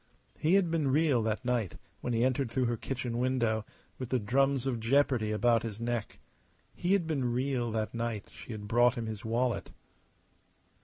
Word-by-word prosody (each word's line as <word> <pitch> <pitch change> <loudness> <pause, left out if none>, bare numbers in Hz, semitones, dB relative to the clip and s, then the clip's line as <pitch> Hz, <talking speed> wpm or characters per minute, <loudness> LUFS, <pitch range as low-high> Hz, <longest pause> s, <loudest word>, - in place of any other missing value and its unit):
He 165 +5 +3
had 185 -4 +3
been 160 -4 +1
real 140 -2 +3
that 110 +3 -2
night 120 -7 0 0.2
when 125 - -3
he 115 0 +2
entered 130 0 +1
through 130 +2 0
her 120 0 +1
kitchen 120 0 -3
window, 120 -4 +1 0.3
with 130 -2 -4
the 130 - +2
drums 135 +4 +1
of 125 -4 -1
jeopardy 120 -2 +2
about 115 +1 +3
his 110 -2 -5
neck. 120 -2 -3 0.6
He 180 +2 0
had 195 -4 +2
been 135 -6 0
real 125 -1 0
that 110 -1 -2
night 115 -3 -3
she - - -10
had 105 -2 -6
brought 120 +2 +4
him 115 - -3
his 110 -2 -5
wallet. 120 +2 0
120 Hz, 185 wpm, -31 LUFS, 115-135 Hz, 0.6 s, brought